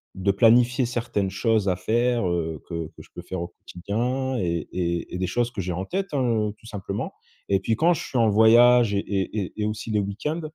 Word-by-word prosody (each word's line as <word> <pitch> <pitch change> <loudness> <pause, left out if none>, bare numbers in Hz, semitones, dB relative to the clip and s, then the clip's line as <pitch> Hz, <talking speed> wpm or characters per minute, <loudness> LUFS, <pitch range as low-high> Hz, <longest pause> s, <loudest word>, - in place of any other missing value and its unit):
de 95 +1 +1
planifier 120 +5 +4
certaines 115 -5 -2
choses 105 +1 +1
à 90 - +1
faire, 115 +3 +1
heu, 80 -3 -2
que 85 -2 -4
que - - -14
je - - -21
peux - - -7
faire 95 -2 -5
au 85 - -5
quotidien 125 +10 -3
et 85 -3 -2
et 85 -1 -2
et - - -2
des 95 - -1
choses 120 +6 0
que 100 - -4
j'ai 90 0 -3
en 90 +3 -3
tête 195 - -2
hein, 120 -6 +1
heu, 105 - -7
tout - - -21
simplement 100 -4 -5 0.4
et 100 -1 +3
puis 110 +4 0
quand 165 +9 +3
je 165 - -4
suis 130 - -3
en 115 -2 +4
voyage 115 +1 +6
et 100 - +1
et 100 0 -2
et - - +1
aussi 105 +1 -4
le 105 - +2
week-end 105 +12 -3
105 Hz, 230 wpm, -24 LUFS, 95-120 Hz, 0.4 s, voyage